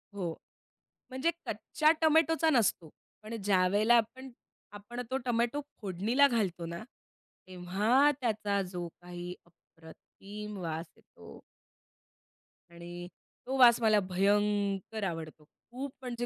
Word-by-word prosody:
हो. 175 Hz, -4 st, -3 dB, 0.8 s
म्हणजे 265 Hz, +6 st, 0 dB
कच्च्या 310 Hz, 0 st, +1 dB
टोमॅटोचा 320 Hz, +1 st, +4 dB
नसतो. 215 Hz, -, +2 dB, 0.3 s
पण 220 Hz, +2 st, -6 dB
ज्यावेळेला 205 Hz, +4 st, +3 dB
आपण, 255 Hz, +4 st, -2 dB, 0.4 s
आपण 210 Hz, +4 st, -7 dB
तो 265 Hz, -, +1 dB
टोमॅटो 240 Hz, +3 st, 0 dB, 0.2 s
फोडणीला 215 Hz, +9 st, +3 dB
घालतो 195 Hz, -9 st, -1 dB
ना, 170 Hz, +3 st, -6 dB, 0.6 s
तेव्हा 200 Hz, +10 st, +2 dB
त्याचा 210 Hz, -4 st, 0 dB
जो 175 Hz, -2 st, -4 dB
काही 175 Hz, 0 st, -7 dB
अप्रतिम 195 Hz, +5 st, -12 dB
वास 165 Hz, -1 st, -4 dB
येतो. -, -, -15 dB, 1.3 s
आणि 175 Hz, +1 st, -9 dB, 0.4 s
तो 265 Hz, +1 st, -1 dB
वास 240 Hz, -2 st, +7 dB
मला 215 Hz, -2 st, +4 dB
भयंकर 205 Hz, +2 st, +1 dB
आवडतो. 160 Hz, -2 st, -8 dB, 0.3 s
खूप 265 Hz, +3 st, -5 dB
म्हणजे 240 Hz, -1 st, -4 dB
210 Hz, 105 wpm, -31 LUFS, 180-245 Hz, 1.3 s, वास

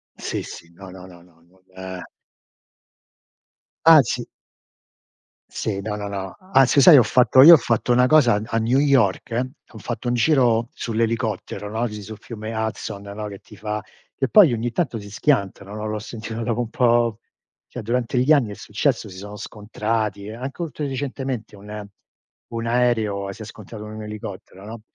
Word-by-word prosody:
Sì, -, -, -4 dB
sì, 85 Hz, 0 st, -11 dB
no, 95 Hz, +1 st, -12 dB
no, 90 Hz, 0 st, -11 dB
no, 90 Hz, -2 st, -15 dB
no. 85 Hz, -2 st, -25 dB, 0.3 s
Eh 95 Hz, -1 st, -7 dB, 1.8 s
Anzi 140 Hz, -7 st, +5 dB, 1.2 s
Sì, 100 Hz, -3 st, -3 dB
no, 105 Hz, +1 st, -4 dB
no 105 Hz, -1 st, -5 dB
no. 95 Hz, -1 st, -5 dB, 0.2 s
Anzi 135 Hz, -1 st, +5 dB
sai 160 Hz, -3 st, +9 dB
ho 125 Hz, -, +7 dB
fatto 125 Hz, +3 st, +5 dB
io 170 Hz, +4 st, +11 dB
ho -, -, +10 dB
fatto 120 Hz, -1 st, 0 dB
una 125 Hz, +1 st, +4 dB
cosa 135 Hz, -5 st, +5 dB
a 105 Hz, -, -1 dB
a 115 Hz, -, -2 dB
New 120 Hz, +4 st, +2 dB
York: 125 Hz, -3 st, +2 dB, 0.2 s
ho -, -, -13 dB
fatto 120 Hz, 0 st, -4 dB
un -, -, +1 dB
giro 120 Hz, -4 st, +3 dB
sull'elicottero 115 Hz, -3 st, -2 dB
no, 115 Hz, +3 st, -1 dB
lì 105 Hz, -2 st, -6 dB
sul 110 Hz, +1 st, -9 dB
fiume 110 Hz, -1 st, -8 dB
Hudson 110 Hz, -2 st, -4 dB
no, 105 Hz, +1 st, -6 dB
che 100 Hz, -1 st, -9 dB
ti 105 Hz, -, -16 dB
fa 105 Hz, +1 st, -4 dB, 0.3 s
che 135 Hz, -, -1 dB
poi 190 Hz, -, +6 dB
ogni 120 Hz, +1 st, -2 dB
tanto 130 Hz, -10 st, -1 dB
si 100 Hz, 0 st, -10 dB
schiantano 100 Hz, -5 st, -1 dB
no, 110 Hz, 0 st, -5 dB
l'ho 105 Hz, 0 st, -3 dB
sentito 115 Hz, 0 st, -6 dB
dopo 115 Hz, +1 st, -1 dB
un 120 Hz, -2 st, -2 dB
po' 120 Hz, -3 st, +2 dB, 0.5 s
cioè 125 Hz, -, -7 dB
durante 120 Hz, +2 st, -1 dB
gli 140 Hz, +5 st, +4 dB
anni 120 Hz, -8 st, +2 dB
è -, -, -7 dB
successo, -, -, -1 dB
si 95 Hz, -, -11 dB
sono 105 Hz, +2 st, -9 dB
scontrati, 105 Hz, 0 st, -3 dB
anche 130 Hz, +8 st, -7 dB
oltre 150 Hz, -2 st, -5 dB
recentemente 130 Hz, -5 st, -4 dB
un 105 Hz, +1 st, -9 dB, 0.6 s
un 115 Hz, 0 st, -4 dB
aereo 110 Hz, -5 st, 0 dB
si 110 Hz, -, -11 dB
è -, -, -6 dB
scontrato 110 Hz, 0 st, -10 dB
un 110 Hz, 0 st, -8 dB
elicottero 100 Hz, -2 st, -9 dB
no; 110 Hz, 0 st, -9 dB
110 Hz, 175 wpm, -22 LUFS, 105-125 Hz, 1.8 s, io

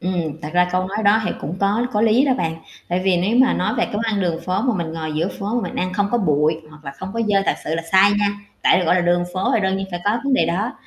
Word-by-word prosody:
Ừm, 165 Hz, -4 st, -3 dB
thật 150 Hz, -, -4 dB
ra 180 Hz, 0 st, +3 dB
câu 185 Hz, 0 st, 0 dB
nói 200 Hz, -, -5 dB
đó 205 Hz, +2 st, +5 dB
thì -, -, -1 dB
cũng 160 Hz, +6 st, -5 dB
có 205 Hz, +5 st, +1 dB
có 210 Hz, -, +1 dB
lý 225 Hz, +4 st, +4 dB
đó 270 Hz, -, +2 dB
bạn. 165 Hz, -5 st, -2 dB, 0.3 s
Tại 180 Hz, +1 st, 0 dB
vì 190 Hz, -2 st, +3 dB
nếu 195 Hz, +7 st, +1 dB
mà 260 Hz, +1 st, +5 dB
nói 215 Hz, +5 st, -1 dB
về 235 Hz, -, +1 dB
cái -, -, -8 dB
món 210 Hz, -, -1 dB
ăn 220 Hz, -3 st, -1 dB
đường 170 Hz, -3 st, -1 dB
phố 185 Hz, +3 st, -1 dB
mà 250 Hz, -2 st, +1 dB
mình 170 Hz, -4 st, -3 dB
ngồi 160 Hz, -1 st, -4 dB
giữa 160 Hz, +4 st, -1 dB
phố 205 Hz, +3 st, -3 dB
mà 240 Hz, -, +1 dB
mình -, -, -5 dB
ăn 185 Hz, 0 st, -2 dB
không 200 Hz, +1 st, 0 dB
có 240 Hz, -, +1 dB
bụi, 155 Hz, -5 st, +2 dB, 0.2 s
hoặc 150 Hz, 0 st, -16 dB
là 140 Hz, -, -6 dB
không 190 Hz, +6 st, -8 dB
có 230 Hz, -, -2 dB
dơ 200 Hz, -1 st, +3 dB
thật -, -, +2 dB
sự 155 Hz, -, -2 dB
là 165 Hz, -, -2 dB
sai 190 Hz, +2 st, +6 dB
nha, 205 Hz, -, +2 dB, 0.4 s
tại -, -, +5 dB
được 180 Hz, -, 0 dB
gọi 180 Hz, -, +4 dB
là 185 Hz, -, +3 dB
đường 175 Hz, 0 st, +2 dB
phố 185 Hz, +1 st, 0 dB
thì 225 Hz, -, +2 dB
đương 190 Hz, 0 st, 0 dB
nhiên 195 Hz, 0 st, -4 dB
phải 175 Hz, -1 st, -4 dB
có 210 Hz, +3 st, +1 dB
vấn 275 Hz, -1 st, +2 dB
đề 165 Hz, -, +2 dB
đó. 195 Hz, +8 st, -1 dB
190 Hz, 325 wpm, -20 LUFS, 170-210 Hz, 0.4 s, sai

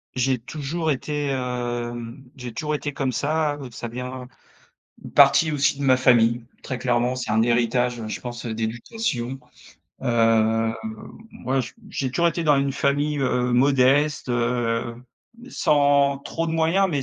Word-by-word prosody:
J'ai 130 Hz, 0 st, +1 dB
toujours 155 Hz, +6 st, -4 dB
été, 145 Hz, +1 st, -2 dB
hem 120 Hz, -1 st, -4 dB
j'ai 125 Hz, -3 st, -8 dB
toujours 150 Hz, +2 st, -2 dB
été 145 Hz, 0 st, -4 dB
comme 135 Hz, -1 st, -1 dB
ça, 150 Hz, +2 st, 0 dB
heu, 130 Hz, -, -7 dB
ça 120 Hz, -, -6 dB
vient 125 Hz, +2 st, -6 dB, 0.8 s
une -, -, -9 dB
partie 145 Hz, +3 st, +6 dB
aussi 145 Hz, -1 st, +1 dB
de -, -, -3 dB
ma 130 Hz, -1 st, +5 dB
famille, 120 Hz, -2 st, +3 dB, 0.2 s
très 130 Hz, -, -4 dB
clairement. 125 Hz, 0 st, 0 dB
C'est 125 Hz, -4 st, -3 dB
un 110 Hz, +1 st, +3 dB
héritage, 120 Hz, +1 st, +1 dB
heu, 110 Hz, -, -5 dB
je -, -, -4 dB
pense 120 Hz, -1 st, -7 dB
d'éducation. 120 Hz, -, -3 dB, 0.6 s
Heu, 115 Hz, -2 st, +2 dB, 0.6 s
moi 135 Hz, +1 st, -2 dB
j 115 Hz, -4 st, -6 dB, 0.2 s
j'ai 130 Hz, -2 st, -2 dB
toujours 170 Hz, +6 st, +2 dB
été 170 Hz, +1 st, -2 dB
dans 150 Hz, -2 st, +4 dB
une 140 Hz, 0 st, 0 dB
famille, 145 Hz, +2 st, 0 dB
heu, 125 Hz, -2 st, 0 dB
modeste, 135 Hz, +3 st, +3 dB
heu, 120 Hz, -1 st, -1 dB, 0.5 s
sans 140 Hz, -1 st, +3 dB
trop 165 Hz, +4 st, -4 dB
de 160 Hz, -, -2 dB
moyens, 165 Hz, +4 st, +2 dB
mais 145 Hz, -4 st, -1 dB
130 Hz, 155 wpm, -23 LUFS, 120-145 Hz, 0.8 s, partie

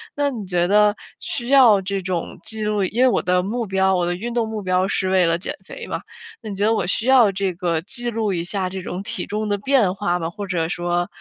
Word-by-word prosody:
那 285 Hz, -1 st, +1 dB
你 230 Hz, -5 st, -5 dB
觉 175 Hz, -1 st, +1 dB
得 210 Hz, +1 st, +4 dB, 0.2 s
需 240 Hz, 0 st, -5 dB
要 250 Hz, -7 st, +7 dB
这 195 Hz, +1 st, -2 dB
种 185 Hz, -2 st, -4 dB
记 220 Hz, -1 st, -6 dB
录 210 Hz, -1 st, 0 dB
因 230 Hz, +7 st, +1 dB
为 -, -, +6 dB
我 -, -, +1 dB
的 180 Hz, 0 st, +1 dB
目 225 Hz, +4 st, -3 dB
标 190 Hz, 0 st, +2 dB
我 180 Hz, -, +1 dB
的 175 Hz, -, -1 dB
运 235 Hz, +6 st, -5 dB
动 235 Hz, -2 st, 0 dB
目 215 Hz, -2 st, -4 dB
标 185 Hz, 0 st, +1 dB
是 190 Hz, -1 st, -1 dB
为 185 Hz, -1 st, +4 dB
了 165 Hz, 0 st, +2 dB
减 175 Hz, -, -4 dB
肥 -, -, -8 dB
嘛， -, -, -4 dB, 0.4 s
那 220 Hz, -, -7 dB
你 200 Hz, -, -5 dB
觉 200 Hz, +2 st, 0 dB
得 220 Hz, -, +3 dB
我 200 Hz, -5 st, -1 dB
需 220 Hz, -, 0 dB
要 250 Hz, -6 st, +6 dB
这 195 Hz, -1 st, -1 dB
个 170 Hz, -2 st, -1 dB
记 240 Hz, +6 st, -3 dB
录 220 Hz, -3 st, -1 dB
一 170 Hz, -2 st, -2 dB
下 190 Hz, +1 st, -2 dB
这 190 Hz, 0 st, -6 dB
种 180 Hz, +1 st, -5 dB
体 -, -, -4 dB
重 210 Hz, +1 st, -2 dB
的 205 Hz, -, +2 dB
变 225 Hz, -4 st, +2 dB
化 195 Hz, -3 st, -1 dB
吗？ 165 Hz, -1 st, -4 dB
或 205 Hz, +1 st, -6 dB
者 170 Hz, -4 st, -1 dB
说， 175 Hz, 0 st, -1 dB
195 Hz, 280 characters per minute, -21 LUFS, 180-220 Hz, 0.4 s, 要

